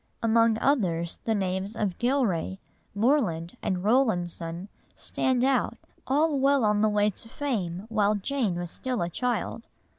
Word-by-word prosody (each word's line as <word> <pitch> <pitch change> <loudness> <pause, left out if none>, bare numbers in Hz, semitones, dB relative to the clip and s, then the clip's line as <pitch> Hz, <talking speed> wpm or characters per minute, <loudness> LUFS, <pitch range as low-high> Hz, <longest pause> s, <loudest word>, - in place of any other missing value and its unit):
Among 230 0 +4
others 175 - 0
the 225 - +1
names 190 +2 -2
of 205 -5 -2
Gillray, 235 - 0 0.4
Morland, 200 - +1
Rowlandson 180 -4 0 0.3
stand 255 -1 0
out, 265 -1 +1 0.3
all 295 +2 +2
well 275 -2 +3
on 210 0 +2
the 215 - +4
way 210 0 +2
to 225 +4 -10
fame 205 -10 -3
while 215 -2 +2
Jane 215 -2 -1
was 175 -1 -4
still 250 -7 -2
a 170 - -2
child. 235 +3 -2
215 Hz, 140 wpm, -27 LUFS, 185-255 Hz, 0.4 s, Among